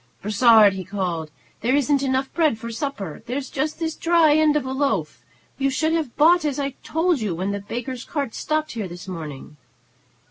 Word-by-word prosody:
"Brossard," 215 -1 +6
he 190 -1 -5
called, 175 -5 -3 0.3
"there 250 +4 +2
isn't 285 0 +2
enough 265 0 -1
bread 315 -8 +2
for 230 +1 -7
supper; 230 - -5
there's 260 +2 -4
just 300 +3 -2
this 325 -1 -2
dry 330 -3 +4
end 305 -1 +4
of 295 -3 0
a 260 - -3
loaf. 265 - -1 0.4
You 275 0 +2
should 315 +4 0
have 315 -7 -2
bought 340 +3 +5
as 295 -2 -1
I 280 -1 -1
told 330 -1 +1
you, 200 -6 -1
when 190 +4 -2
the 200 - -3
baker's 240 +5 -5
cart 280 -7 -3
stopped 310 0 -2
here 220 -5 -4
this 175 +2 -10
morning." 150 -5 -8
260 Hz, 190 wpm, -23 LUFS, 200-300 Hz, 0.4 s, Brossard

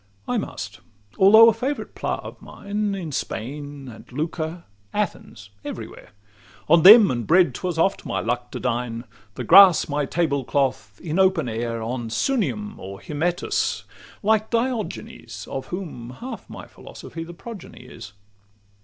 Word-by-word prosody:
I - - 0
must, - - -7 0.4
although 220 +4 +8
a 230 - +5
favourite 260 +6 -4
'plat' - - -3
of - - -10
mine 205 0 -3
In 170 -5 -5
Spain, 140 +3 -5
and 115 0 -12
Lucca, 160 +4 -4 0.3
Athens, 115 - -4
every - - -6
where: - - -14 0.6
On 165 +2 +6
them 210 +3 +9
and 120 -2 -3
bread 170 -4 +4
'twas 180 +4 -4
oft 190 +4 +1
my - - -2
luck 120 +2 -2
to - - -4
dine, 120 -2 -2 0.3
The - - -4
grass 190 -1 +7
my 145 -1 -1
table 145 -5 0
cloth, 130 -8 -1
in 165 +1 -2
open 185 -7 +3
air, 115 0 -3
On 120 0 -4
Sunium 210 - -1
or 95 +1 -8
Hymettus, 165 +4 -1 0.4
like 215 +1 +2
Diogenes, 230 - -3
Of 135 - -5
whom 165 -11 -6
half 260 +2 -8
my - - -9
philosophy 165 - -10
the 170 +1 -10
progeny 220 0 -10
is. 100 - -11
165 Hz, 150 wpm, -23 LUFS, 125-200 Hz, 0.6 s, them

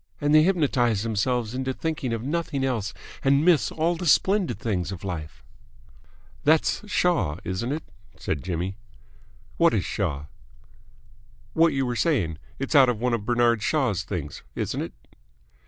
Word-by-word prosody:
And 145 0 +1
they 155 - +8
hypnotise 135 - +2
themselves 115 +1 0
into 130 +1 -2
thinking 155 -6 -2
of 115 -1 -2
nothing 145 -1 -2
else 115 -7 -1 0.3
and 140 +3 +3
miss 175 -5 +4
all 165 +2 0
the 175 +1 -4
splendid 190 +5 +3
things 100 -8 -2
of 95 - -7
life." 80 -9 -6 1.0
"That's 155 +2 +3
Shaw, 125 - +1
isn't 95 +7 -3
it?" 155 +2 -3 0.3
said 75 - -3
Jimmy. 90 +2 -3 0.8
"What - - +4
is - - 0
Shaw?" 70 +1 -2 1.3
"What 165 0 +4
you 135 -1 0
were 120 -1 -2
saying. 105 - 0 0.2
It's 135 - -3
out 135 -4 +7
of 120 -3 -1
one 125 +1 0
of 110 -3 -1
Bernard 120 -2 +3
Shaw's 120 - +1
things, 85 -6 -5
isn't - - -2
it?" - - -5
125 Hz, 155 wpm, -25 LUFS, 100-150 Hz, 1.3 s, they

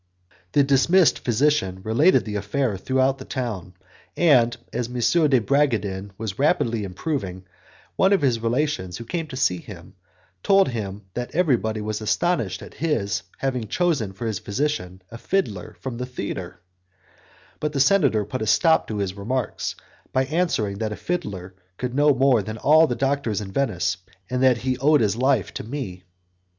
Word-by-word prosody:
The 145 - +5
dismissed 140 +6 +4
physician 120 -6 +1
related 140 - +3
the 105 - -5
affair 105 +3 -1
through 130 +8 -2 0.2
the - - -7
town, 105 -10 -5 0.4
and, 120 -8 +4 0.2
as 120 - -2
M. 125 - -9 0.3
de 130 -3 +4
Bragadin 110 -7 0
was 110 -2 -5
rapidly 120 -7 +1
improving, 95 - -4 0.5
one 190 - +4
of 195 -6 +3
his 125 -4 +2
relations, 115 -6 -1
who 115 - -8
came 165 +6 -3
to 135 - -8
see 110 -9 +2
him, - - -12 0.5
told 195 - +4
him 105 -4 -5
that 120 0 -5
everybody 115 - +1
was 110 +1 -3
astonished 110 - 0
at - - -11
his 135 -11 -1 0.2
having 130 -4 -2
chosen 150 - 0
for 95 +5 -7
his 110 -4 -2
physician 100 -6 -3
a 115 - -9
fiddler 115 - -2
from 130 -3 -5
the 125 +1 -4
theatre; 100 -7 -6 1.0
but 150 - -1
the 145 - -2
senator 135 - +3
put 110 +5 -5
a 110 - -2
stop 160 - +4
to 110 - -4
his 100 -2 -2
remarks 115 +4 -3 0.4
by 130 0 +1
answering 130 - -1
that 110 -1 -2
a - - -3
fiddler 100 - -4 0.2
could 125 -1 -3
know 145 +2 +4
more 130 -3 +3
than 110 +3 -6
all 155 +7 +5
the 120 - -2
doctors 135 -6 0
in 100 -2 -6
Venice, 95 -10 0 0.3
and 125 0 0
that 130 -2 +5
he 130 +1 -2
owed 150 +1 +4
his 105 -2 +2
life 130 -4 +1
to - - -5
me. 110 -7 -6
120 Hz, 170 wpm, -23 LUFS, 105-140 Hz, 1.0 s, The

